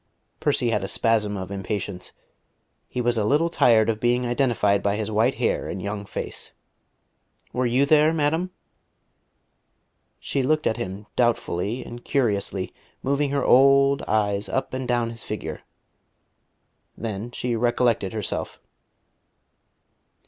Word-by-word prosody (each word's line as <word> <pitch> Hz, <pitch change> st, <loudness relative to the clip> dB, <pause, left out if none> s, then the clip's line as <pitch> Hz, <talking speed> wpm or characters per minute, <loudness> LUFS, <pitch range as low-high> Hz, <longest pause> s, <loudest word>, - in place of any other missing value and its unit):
Percy 120 Hz, -, +1 dB
had 105 Hz, -3 st, 0 dB
a -, -, -2 dB
spasm 105 Hz, -2 st, +1 dB
of 95 Hz, 0 st, -6 dB
impatience: 100 Hz, -1 st, -4 dB, 0.8 s
he 125 Hz, -, -3 dB
was 120 Hz, -1 st, +1 dB
a -, -, +1 dB
little 150 Hz, +9 st, +2 dB
tired 110 Hz, -7 st, +4 dB
of 110 Hz, -1 st, 0 dB
being 120 Hz, +1 st, +1 dB
identified 120 Hz, -5 st, +2 dB
by 100 Hz, 0 st, +1 dB
his 110 Hz, 0 st, -3 dB
white 115 Hz, +5 st, +2 dB
hair 120 Hz, -, -1 dB
and 95 Hz, -, -4 dB
young 100 Hz, +1 st, -5 dB
face. -, -, -5 dB, 1.0 s
"Were 125 Hz, 0 st, +1 dB
you 130 Hz, +4 st, +3 dB
there, 155 Hz, +1 st, +5 dB
madam?" 160 Hz, +3 st, 0 dB, 1.7 s
She 135 Hz, -, -1 dB
looked 155 Hz, +4 st, +1 dB
at 110 Hz, -, +1 dB
him 95 Hz, +3 st, -5 dB
doubtfully 115 Hz, -2 st, 0 dB
and 120 Hz, 0 st, -9 dB
curiously, 100 Hz, -7 st, -1 dB, 0.3 s
moving 140 Hz, +1 st, +1 dB
her 140 Hz, -1 st, 0 dB
old, 140 Hz, +1 st, +5 dB
eyes 105 Hz, -1 st, 0 dB
up 135 Hz, -, -2 dB
and 130 Hz, -1 st, -3 dB
down 120 Hz, -1 st, 0 dB
his 115 Hz, -, -9 dB
figure. 80 Hz, -8 st, -5 dB, 1.4 s
Then 110 Hz, 0 st, -4 dB
she 120 Hz, 0 st, -2 dB
recollected 120 Hz, -3 st, +1 dB
herself. 105 Hz, -4 st, -3 dB
115 Hz, 135 wpm, -24 LUFS, 105-130 Hz, 1.7 s, there